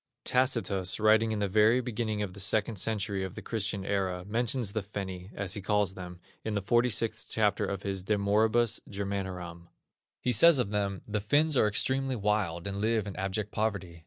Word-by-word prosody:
Tacitus, 115 -8 +1
writing 110 +1 +4
in 110 - -1
the 100 -1 0
very 110 +5 +4
beginning 110 -3 -2
of 95 -3 -5
the 100 - -9
second 110 +2 0
century 100 -1 -1
of 95 -2 -6
the - - -7
Christian 100 -3 -2
era, 95 -3 -1
mentions 115 +1 0
the 110 - -2
Fenni, 95 -2 -6
as 100 -2 -2
he 105 - -4
calls 105 -1 +1
them, 90 -2 -9 0.2
in 110 -1 -3
the 100 - 0
46th 115 0 +1
chapter 105 -2 +1
of 100 0 -4
his 95 -2 -3
De 105 +2 +1
Moribus 110 +3 +2
Germanoram. 95 -4 -5 0.5
He 125 - 0
says 155 +8 +7
of 115 -6 0
them: 100 -2 -2
"The 105 -1 -2
Finns 145 +8 +2
are 115 - +4
extremely 130 +5 +1
wild, 100 -6 -1
and 100 0 -3
live 110 -1 +1
in 100 - -6
abject 100 +2 -3
poverty. 100 -6 -2
105 Hz, 190 wpm, -29 LUFS, 95-110 Hz, 0.5 s, says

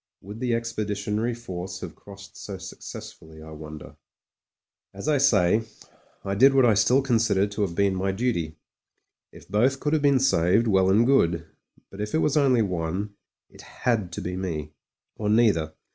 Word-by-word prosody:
Would 105 +4 -9
the 120 -2 0
Expeditionary 110 0 -2
Force 95 -6 -7
have - - -7
crossed 100 -1 -14
so 100 -2 -7
successfully, 80 -3 -10
I 80 - -11
wonder? 75 0 -10 1.0
As 100 - -7
I 150 -2 +3
say, 110 -7 +3 0.6
I 100 - -1
did 135 +7 +5
what 135 -2 +5
I 115 - +5
still 115 +6 +3
consider 110 -6 +2
to 105 +1 -5
have 90 -4 -1
been 100 0 +2
my 95 +1 -1
duty. 95 -8 -2 0.7
If - - -15
both 125 +8 +1
could 150 +2 -1
have 155 - +2
been 140 -2 +4
saved, 105 -4 +3
well 95 -3 +3
and 110 +5 +4
good; 85 -11 +2 0.5
but 100 - -8
if 105 +5 -3
it - - +4
was 150 -2 +1
only 130 -6 +4
one, 90 +2 -3 0.3
it - - -16
had 110 -7 -2
to - - -5
be 90 +1 -4
me, 80 -5 -4 0.4
or 105 -1 -2
neither. 100 -9 +2
105 Hz, 175 wpm, -25 LUFS, 90-120 Hz, 1.0 s, did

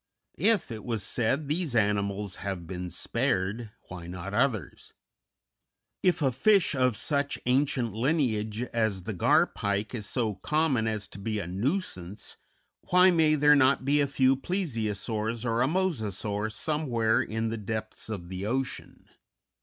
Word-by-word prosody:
If, 220 - +2
it 110 -2 -6
was 115 -4 -2
said, 130 +8 0
these 155 -3 -1
animals 100 -2 0
have 95 -4 -4
been 90 +1 -5
spared, 110 - -1 0.2
why 90 -2 -8
not 90 +2 -6
others? 110 -1 -1 1.1
If 180 -4 +2
a 135 - +3
fish 200 - +3
of 125 -5 +1
such 140 -1 0
ancient 125 -3 +1
lineage 115 -4 0
as 110 -5 0
the 110 - -4
Gar 90 - +4
Pike 100 +3 -3
is 105 -4 -4
so 115 -3 -1
common 135 - 0
as 105 -3 -2
to - - -10
be 110 +2 -2
a 100 - -3
nuisance, 100 - -3 0.5
why 180 +1 +6
may 160 -3 +4
there 150 0 +6
not 135 -1 +3
be 145 +1 +3
a 140 - +2
few 135 -1 +3
Plesiosaurs 115 - -2
or 115 0 +1
a 130 - +3
Mosasaur 110 - -1
somewhere 120 -4 0
in 110 +1 -2
the 115 - -3
depths 110 +1 -5
of 90 -5 -5
the 95 +1 -5
ocean? 130 +3 -4
115 Hz, 150 wpm, -28 LUFS, 105-140 Hz, 1.1 s, why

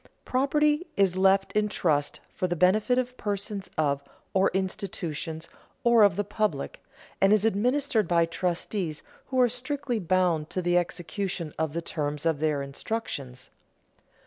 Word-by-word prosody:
Property 295 +5 +2
is 195 -2 +3
left 195 +1 +3
in 210 0 +1
trust 150 -7 0
for 185 - -1
the 175 - -1
benefit 205 +8 +3
of 250 0 -1
persons 200 -1 -3
or 155 - +3 0.6
of - - -3
institutions 165 -4 -3 0.4
or 235 -2 +5
of 200 -3 +6
the 205 - 0
public, 205 -8 -2 0.4
and 195 +1 +5
is 210 0 +4
administered 225 0 +1
by 170 -1 +3
trustees 175 -1 -2 0.2
who 260 -1 -1
are 250 - +6
strictly 255 +1 -3
bound 175 -4 +1
to - - -2
the 175 0 +2
execution 175 -1 -2
of 160 -2 -1
the 170 +1 -3
terms 150 -2 -3
of 160 -3 +2
their 150 -2 0
instructions. 140 - -5
190 Hz, 145 wpm, -27 LUFS, 165-220 Hz, 0.6 s, of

